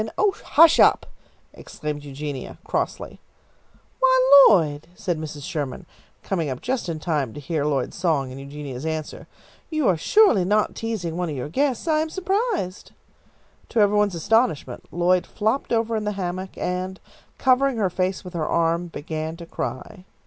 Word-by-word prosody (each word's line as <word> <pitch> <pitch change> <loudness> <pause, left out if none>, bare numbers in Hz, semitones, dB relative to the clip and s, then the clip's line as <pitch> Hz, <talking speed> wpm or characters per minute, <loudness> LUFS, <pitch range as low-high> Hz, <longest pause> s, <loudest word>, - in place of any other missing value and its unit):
"Oh, 415 -1 +3
hush 330 +1 +6
up!" - - +5 0.5
exclaimed 150 -1 -6
Eugenia, 140 -1 -6
crossly. - - -3 0.8
"Why, 265 +1 +7
Lloyd," 155 -7 +2
said 175 -4 -2
Mrs. 150 -2 -7
Sherman, 145 -5 -4 0.4
coming 165 -6 -2
up 130 -1 -4
just 255 -5 -2
then 165 - -2
in - - -7
time 150 -8 -2
to - - -6
hear 145 +1 -2
Lloyd's 140 -4 -1
song 155 -8 0
and 135 +1 -8
Eugenia's 140 -2 -7
answer, 160 -1 -5 0.4
"you 310 -5 0
are 180 - +3
surely 320 - +4
not 210 +3 +1
teasing 200 -8 -4
one 180 -2 -2
of 150 - -4
your 130 +2 -5
guests! 270 - -1
I 310 -1 +3
am 315 +1 -1
surprised!" 380 - -2 0.8
To 235 - 0
every 205 0 +4
one's 205 -3 +2
astonishment, 170 - 0
Lloyd 175 +1 +2
flopped 220 +6 -1
over 230 -1 +1
in 215 - -1
the 210 - -1
hammock, 185 0 -5
and, 185 +1 -3 0.4
covering 260 0 +3
her 195 -4 0
face 185 +2 -1
with 180 -1 -10
her 160 -3 -2
arm, 170 +1 +1
began 160 0 -5
to 170 - -9
cry. 180 +3 -6
180 Hz, 165 wpm, -23 LUFS, 155-225 Hz, 0.8 s, Why